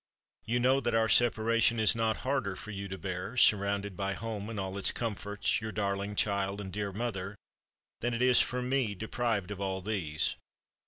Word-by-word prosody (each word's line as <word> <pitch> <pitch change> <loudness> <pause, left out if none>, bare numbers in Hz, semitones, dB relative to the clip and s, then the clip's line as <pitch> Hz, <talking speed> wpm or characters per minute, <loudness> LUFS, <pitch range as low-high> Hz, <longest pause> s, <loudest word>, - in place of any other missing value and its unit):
You 120 +2 0
know 130 +2 +4
that 120 -4 -1
our 110 0 +3
separation 115 +1 +3
is 110 -2 +6
not 115 -1 0
harder 130 -8 0
for 110 - -8
you 100 -1 -5
to 95 0 -6
bear, 95 +5 -5
surrounded 100 -3 +3
by 100 +1 -2
home 110 0 -5
and 110 -3 -4
all 95 0 -4
its - - +3
comforts, 105 -2 -2
your 110 0 -4
darling 100 0 -2
child 100 -1 +1
and 95 -3 -7
dear 100 0 -2
mother, 100 -2 -4 0.6
than 120 0 -1
it 115 - -3
is 125 -1 +6
for 125 +1 -1
me 125 -5 0
deprived 110 -1 -2
of 100 -1 -6
all 95 -1 -2
these. 90 -7 -1
105 Hz, 190 wpm, -30 LUFS, 100-115 Hz, 0.6 s, is